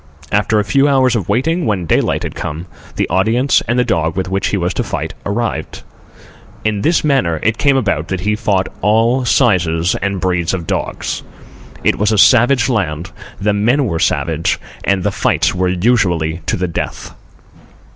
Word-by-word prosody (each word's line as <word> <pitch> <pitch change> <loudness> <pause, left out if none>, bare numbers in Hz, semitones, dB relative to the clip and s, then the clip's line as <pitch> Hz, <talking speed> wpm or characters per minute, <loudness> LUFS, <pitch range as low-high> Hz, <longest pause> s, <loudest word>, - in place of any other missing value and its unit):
After 105 +1 +2
a - - +1
few 140 +5 +3
hours 130 -3 +3
of 100 -7 -2
waiting, 165 +7 0
when 100 -5 -1
daylight - - +1
had - - -4
come, 80 +4 -5 0.3
the - - 0
audience 110 +9 +2
and 120 +2 0
the 125 - +3
dog 80 -9 -1
with 95 -1 -2
which 95 +1 -1
he 100 - -1
was 90 0 -1
to - - -1
fight - - -4
arrived. 100 -6 -3 0.8
In 105 -2 0
this 165 +6 +2
manner 95 - +1
it 110 +1 0
came 140 -2 +3
about 100 - -1
that 95 0 -3
he 105 +2 0
fought 100 -4 0
all 115 +5 +2
sizes 90 -9 +2
and 100 -1 -1
breeds 90 -1 0
of 85 -3 -5
dogs. - - -3 0.6
It - - +1
was 105 +1 +2
a 110 - +1
savage 120 +2 +5
land, 90 -7 -2 0.3
the 105 +1 +1
men 120 +7 +2
were 85 -8 -2
savage, - - 0 0.2
and 100 -2 +1
the - - 0
fights - - +1
were 95 0 0
usually 90 -5 +1
to - - 0
the 90 - -1
death. 85 - -5
100 Hz, 180 wpm, -16 LUFS, 90-120 Hz, 0.8 s, savage